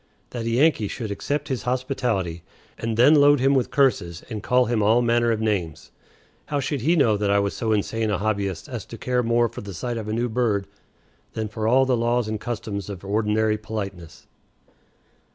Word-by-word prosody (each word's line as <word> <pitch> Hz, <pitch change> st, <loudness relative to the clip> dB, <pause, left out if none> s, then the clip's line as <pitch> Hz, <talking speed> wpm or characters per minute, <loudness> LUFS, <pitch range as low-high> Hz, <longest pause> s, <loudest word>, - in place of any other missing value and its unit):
That 115 Hz, -2 st, -4 dB
a -, -, +1 dB
Yankee 125 Hz, -2 st, +3 dB
should 110 Hz, +1 st, -5 dB
accept 145 Hz, +9 st, -3 dB
his 130 Hz, -3 st, -2 dB
hospitality, 125 Hz, -, -2 dB, 0.3 s
and 115 Hz, -1 st, -3 dB
then 130 Hz, +6 st, +6 dB
load 145 Hz, -1 st, +6 dB
him 135 Hz, +2 st, +3 dB
with 130 Hz, -3 st, +1 dB
curses 90 Hz, -12 st, +1 dB
and 105 Hz, -2 st, -4 dB
call 125 Hz, +3 st, +3 dB
him 115 Hz, -2 st, 0 dB
all 110 Hz, +4 st, +4 dB
manner 120 Hz, 0 st, +2 dB
of 110 Hz, -, 0 dB
names! 100 Hz, -8 st, -2 dB, 0.6 s
How 145 Hz, -, -1 dB
should 140 Hz, 0 st, -2 dB
he 165 Hz, +8 st, +3 dB
know 115 Hz, -9 st, +3 dB
that 105 Hz, 0 st, -1 dB
I 100 Hz, -, +3 dB
was 100 Hz, 0 st, 0 dB
so 110 Hz, -1 st, -1 dB
insane 110 Hz, +1 st, 0 dB
a 100 Hz, -, +1 dB
hobbyist 100 Hz, -5 st, -2 dB
as -, -, -6 dB
to -, -, -9 dB
care 125 Hz, -1 st, 0 dB
more 120 Hz, 0 st, +2 dB
for 115 Hz, -, -9 dB
the 100 Hz, -2 st, -8 dB
sight 120 Hz, +6 st, -3 dB
of 110 Hz, -2 st, -5 dB
a 110 Hz, -, -2 dB
new 120 Hz, +2 st, 0 dB
bird 110 Hz, -4 st, 0 dB, 0.7 s
than 110 Hz, -1 st, -3 dB
for 110 Hz, 0 st, -3 dB
all 130 Hz, +3 st, +4 dB
the 130 Hz, -1 st, +2 dB
laws 120 Hz, 0 st, 0 dB
and 110 Hz, -1 st, -3 dB
customs 105 Hz, -3 st, -5 dB
of 95 Hz, -2 st, -8 dB
ordinary 105 Hz, +1 st, +1 dB
politeness? 95 Hz, -7 st, -7 dB
110 Hz, 205 wpm, -23 LUFS, 105-125 Hz, 0.7 s, then